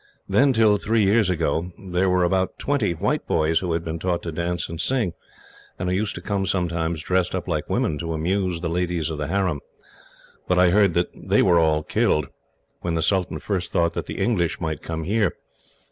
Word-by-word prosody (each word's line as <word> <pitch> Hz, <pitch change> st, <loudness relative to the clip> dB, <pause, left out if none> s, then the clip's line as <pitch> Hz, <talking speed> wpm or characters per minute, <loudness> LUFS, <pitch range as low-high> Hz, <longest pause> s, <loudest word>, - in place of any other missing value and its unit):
Then, 140 Hz, +1 st, +4 dB
till 110 Hz, -4 st, +4 dB
three 110 Hz, +2 st, +1 dB
years 100 Hz, 0 st, +3 dB
ago, 85 Hz, 0 st, -1 dB
there 95 Hz, 0 st, 0 dB
were 90 Hz, 0 st, +3 dB
about 95 Hz, +1 st, 0 dB
twenty 135 Hz, -11 st, 0 dB
white -, -, -1 dB
boys 80 Hz, +1 st, +2 dB
who 90 Hz, -2 st, -3 dB
had 80 Hz, 0 st, -1 dB
been 80 Hz, 0 st, -4 dB
taught 90 Hz, 0 st, -1 dB
to 85 Hz, -, -4 dB
dance 85 Hz, +2 st, -2 dB
and 85 Hz, 0 st, -5 dB
sing, 115 Hz, -5 st, 0 dB, 0.6 s
and 90 Hz, -, -2 dB
who -, -, 0 dB
used 105 Hz, +2 st, -1 dB
to -, -, -6 dB
come 100 Hz, -2 st, -1 dB
sometimes, 85 Hz, -3 st, -1 dB
dressed 90 Hz, +1 st, 0 dB
up 90 Hz, -1 st, -4 dB
like 80 Hz, -4 st, -2 dB
women, 75 Hz, -2 st, 0 dB
to 80 Hz, +1 st, -3 dB
amuse 90 Hz, +2 st, -1 dB
the 85 Hz, -, -2 dB
ladies 85 Hz, -2 st, -1 dB
of 75 Hz, -, -5 dB
the 75 Hz, -, -2 dB
harem; 95 Hz, -5 st, 0 dB, 0.9 s
but 90 Hz, -, +2 dB
I 90 Hz, -1 st, +5 dB
heard 100 Hz, -2 st, +4 dB
that 85 Hz, 0 st, +1 dB
they -, -, +1 dB
were 85 Hz, -1 st, +5 dB
all 80 Hz, -1 st, +2 dB
killed, 75 Hz, -2 st, +1 dB, 0.5 s
when 85 Hz, -1 st, -2 dB
the 80 Hz, -, 0 dB
sultan 95 Hz, +1 st, +1 dB
first 95 Hz, -4 st, -3 dB
thought 85 Hz, 0 st, +1 dB
that -, -, -4 dB
the -, -, -6 dB
English 90 Hz, -8 st, 0 dB
might 80 Hz, -4 st, -3 dB
come 80 Hz, -1 st, -4 dB
here. 100 Hz, +1 st, +1 dB
90 Hz, 205 wpm, -23 LUFS, 80-95 Hz, 0.9 s, I